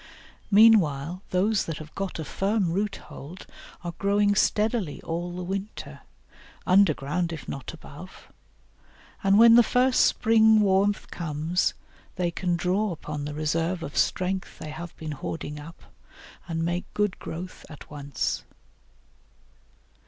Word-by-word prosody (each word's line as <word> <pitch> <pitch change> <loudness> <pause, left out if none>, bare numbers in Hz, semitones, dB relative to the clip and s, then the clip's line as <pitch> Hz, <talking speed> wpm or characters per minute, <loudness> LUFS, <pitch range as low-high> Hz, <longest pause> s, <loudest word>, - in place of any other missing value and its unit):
Meanwhile 185 -7 +4
those 195 +3 +1
that 165 -3 -4
have 155 -1 -10
got 195 -1 -4
a 160 - -5
firm 195 -1 0
root 200 +2 -1
hold 165 +7 -11 0.4
are 175 -1 -4
growing 205 +1 +3
steadily 210 -5 +1
all 175 +2 -3
the 180 - -4
winter, 195 +3 -5 0.7
underground 175 -3 +2
if 160 -4 -7
not 135 - -6
above; 165 +2 -12 0.9
and 195 +1 +5
when 230 +1 +8
the 240 - +9
first 250 +2 +3
spring 220 -1 +5
warmth 200 0 +2
comes 165 +2 -1 0.4
they 175 -2 0
can 175 0 -1
draw 185 +4 0
upon 150 -3 -5
the 145 0 -5
reserve 165 +3 -1
of 140 - -7
strength 185 +1 0
they 155 - -7
have 165 +2 -8
been 155 -1 -6
hoarding 150 +1 -5
up, 165 +3 -12 0.6
and 165 -1 -2
make 175 +1 -3
good 210 -2 0
growth 180 +3 -7
at 150 -2 -12
once. 140 -4 -3
180 Hz, 135 wpm, -26 LUFS, 160-200 Hz, 0.9 s, the